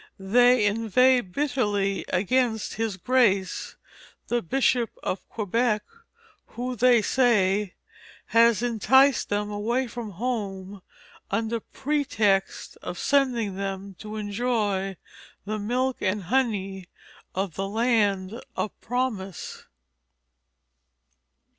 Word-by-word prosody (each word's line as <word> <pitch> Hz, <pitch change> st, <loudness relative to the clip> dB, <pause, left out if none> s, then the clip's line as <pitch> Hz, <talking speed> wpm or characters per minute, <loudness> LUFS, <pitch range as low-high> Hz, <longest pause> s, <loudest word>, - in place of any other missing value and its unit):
They 245 Hz, +4 st, +4 dB
inveigh 230 Hz, +4 st, +3 dB
bitterly 205 Hz, -4 st, -1 dB
against 220 Hz, +4 st, 0 dB
His 220 Hz, -4 st, -2 dB
Grace, 200 Hz, -5 st, +1 dB, 0.5 s
the 240 Hz, 0 st, +1 dB
Bishop 245 Hz, +3 st, +1 dB
of 185 Hz, -, -4 dB
Quebec, 215 Hz, +1 st, 0 dB, 0.7 s
who, 250 Hz, +1 st, -3 dB
they 240 Hz, -1 st, +4 dB
say, 210 Hz, -6 st, +2 dB, 0.6 s
has 230 Hz, -1 st, +5 dB
enticed 255 Hz, +3 st, +3 dB
them 205 Hz, 0 st, -1 dB
away 235 Hz, +5 st, -1 dB
from 230 Hz, -3 st, -7 dB
home 200 Hz, -3 st, -4 dB, 0.5 s
under 225 Hz, +3 st, -1 dB
pretext 225 Hz, -8 st, -1 dB
of 175 Hz, -, -6 dB
sending 245 Hz, -8 st, +1 dB
them 195 Hz, 0 st, -4 dB
to 215 Hz, 0 st, -7 dB
enjoy 205 Hz, -3 st, -1 dB, 0.5 s
the 215 Hz, +1 st, -3 dB
milk 250 Hz, +5 st, -1 dB
and 195 Hz, +1 st, 0 dB
honey 195 Hz, -5 st, -1 dB, 0.5 s
of 190 Hz, -2 st, -2 dB
the 195 Hz, +4 st, -3 dB
land 215 Hz, -2 st, +1 dB
of 215 Hz, -, -2 dB
promise." 225 Hz, -7 st, -3 dB
215 Hz, 95 wpm, -25 LUFS, 195-245 Hz, 0.7 s, has